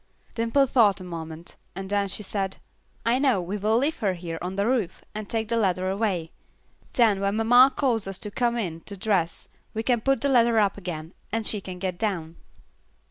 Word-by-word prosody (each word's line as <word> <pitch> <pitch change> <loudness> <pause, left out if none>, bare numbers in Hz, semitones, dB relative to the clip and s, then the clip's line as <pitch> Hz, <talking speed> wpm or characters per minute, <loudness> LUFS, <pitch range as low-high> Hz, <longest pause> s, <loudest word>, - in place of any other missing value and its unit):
Dimple 230 +5 +2
thought 225 -6 +4
a - - -8
moment, 165 -1 -8 0.2
and 190 +1 -5
then 200 0 +1
she 195 +2 -3
said, 195 -1 -2 0.5
"I 235 +3 +3
know, 265 -8 +3
we 180 +3 -4
will 215 +2 +2
leave 285 +6 0
her 195 -5 0
here 165 -2 -6
on 180 +2 -4
the 200 +1 +1
roof, 235 -7 -1
and 215 -1 -6
take 225 -1 -1
the 230 - 0
ladder 185 -3 +1
away; 195 -5 -1 0.6
then 220 -5 +4
when 200 +1 0
mamma 245 +4 +6
calls 235 -7 +1
us 195 -1 -4
to 210 -3 -6
come 240 +1 0
in 170 -7 -3
to 200 - -5
dress 185 -5 0 0.3
we 220 - -1
can 240 -1 +2
put 270 +3 +1
the 280 - +1
ladder 235 -3 +4
up 205 -2 +3
again, 175 -3 -6 0.2
and 225 0 -1
she 210 -1 +1
can 185 -1 -7
get 180 -1 -3
down." 170 -7 -2
205 Hz, 205 wpm, -26 LUFS, 185-230 Hz, 0.6 s, mamma